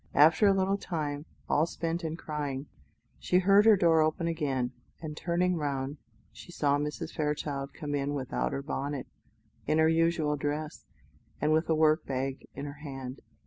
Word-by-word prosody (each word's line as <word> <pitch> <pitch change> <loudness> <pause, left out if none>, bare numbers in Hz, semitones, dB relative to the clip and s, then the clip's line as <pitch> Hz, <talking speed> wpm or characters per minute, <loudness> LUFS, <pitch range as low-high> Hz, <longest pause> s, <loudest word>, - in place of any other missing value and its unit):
After 160 +7 +6
a 200 - +6
little 195 +1 +1
time, 150 -4 -3 0.2
all 155 +3 +3
spent 170 +1 -3
in 160 0 -3
crying, 145 -4 -4 0.5
she 180 - +2
heard 200 +3 +5
her 215 -2 +8
door 165 -3 +4
open 155 +2 +1
again, 140 -7 -1 0.3
and 155 -2 -6
turning 175 +2 0
round, 140 -1 -2 0.3
she - - -12
saw 145 -4 +1
Mrs. 150 +1 -4
Fairchild 145 -2 -2
come 150 -3 -4
in 145 0 -1
without 130 -2 -2
her 135 - -3
bonnet, 140 -1 -3 0.6
in 155 - +2
her 160 0 +5
usual 165 -2 +2
dress, 150 +2 -3 0.5
and 150 +1 +1
with 160 +2 +1
a 160 - +4
work 155 +1 +4
bag 135 0 -3
in 140 - -5
her 145 0 -8
hand. 135 -3 -7
150 Hz, 170 wpm, -30 LUFS, 140-165 Hz, 0.6 s, her